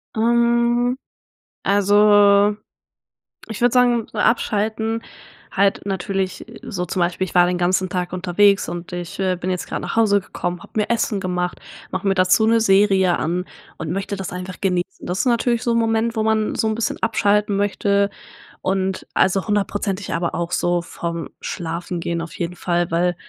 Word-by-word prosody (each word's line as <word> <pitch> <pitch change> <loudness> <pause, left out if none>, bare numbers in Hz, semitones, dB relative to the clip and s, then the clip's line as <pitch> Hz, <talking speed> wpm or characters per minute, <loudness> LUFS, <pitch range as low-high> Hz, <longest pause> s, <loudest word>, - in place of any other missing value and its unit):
Ähm, 235 +2 +2 0.7
also, 205 0 +5 0.9
ich 220 0 -7
würde 245 0 +3
sagen 245 -2 +3
so, - - -9
abschalten 220 0 0 0.5
halt 195 0 +1
natürlich 195 0 -3 0.2
so 180 -2 -4
zum 180 - -3
Beispiel, 175 +2 0
ich 180 - -11
war 175 0 +6
den 180 0 0
ganzen 185 +1 +1
Tag 180 -1 -3
unterwegs 190 +2 +2
und 175 0 -6
ich, 175 0 -6
äh, 185 -1 +1
bin 180 +1 -4
jetzt 180 -1 -3
grad - - -4
nach - - -4
Hause 205 -3 +3
gekommen, 175 -1 -5
habe - - -15
mir 215 0 0
Essen 225 -3 0
gemacht, 180 -1 -2 0.3
mache 185 +2 -2
mir 195 - +4
dazu 185 +4 +4
'ne 230 +1 +4
Serie 195 -3 +4
an 180 +3 -2 0.3
und 160 0 -4
möchte 195 +2 -3
das 195 -2 -5
einfach 180 +1 -7
genießen. 185 -1 -2
Das 180 +2 -2
ist - - +1
natürlich 235 -1 +1
so 235 - +1
'n 230 - +2
Moment, 225 +1 0
wo 220 - 0
man 220 -1 +1
so 220 - 0
'n 220 - 0
bisschen 225 -1 -2
abschalten 210 -2 +2
möchte 200 0 +1 0.5
und 190 0 -1
also, 190 +2 +2
hundertprozentig 205 -1 -1
aber 170 0 -1
auch 170 0 -3
so 175 0 +1
vorm 170 0 -5
Schlafengehen 170 0 -4
auf 165 - -7
jeden 175 +1 -3
Fall, 175 -1 -1
weil 175 +1 +1
195 Hz, 175 wpm, -21 LUFS, 180-215 Hz, 0.9 s, war